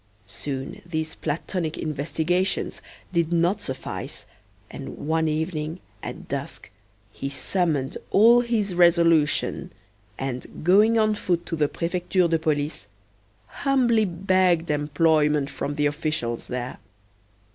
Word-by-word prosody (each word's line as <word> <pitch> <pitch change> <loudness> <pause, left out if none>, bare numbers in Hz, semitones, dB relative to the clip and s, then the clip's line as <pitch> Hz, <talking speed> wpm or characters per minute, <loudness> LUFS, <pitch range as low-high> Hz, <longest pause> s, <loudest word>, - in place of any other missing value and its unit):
Soon 135 - -5
these 160 -2 -3
platonic 160 +1 -3
investigations 160 +5 -1 0.3
did 170 -1 +1
not 175 +4 +2
suffice, 130 -8 -5 0.5
and - - -7
one 160 +2 0
evening, 155 +1 -2 0.2
at - - -7
dusk, - - -5 0.4
he 135 +6 -5
summoned 145 0 -1
all 235 +4 +6
his 220 -5 -1
resolution, 170 -4 +3 0.5
and, 130 +1 -5
going 210 +6 +5
on 215 -1 +3
foot 175 -4 -1
to 165 - -3
the 150 -2 +1
Prefecture 180 +1 0
de 165 -1 +1
Police, 150 - -1 0.6
humbly 240 - +2
begged 180 -2 +2
employment 150 -1 +2
from 145 +1 -3
the 150 -1 +1
officials 145 -6 -1
there. 125 0 -4
165 Hz, 115 wpm, -25 LUFS, 150-185 Hz, 0.6 s, all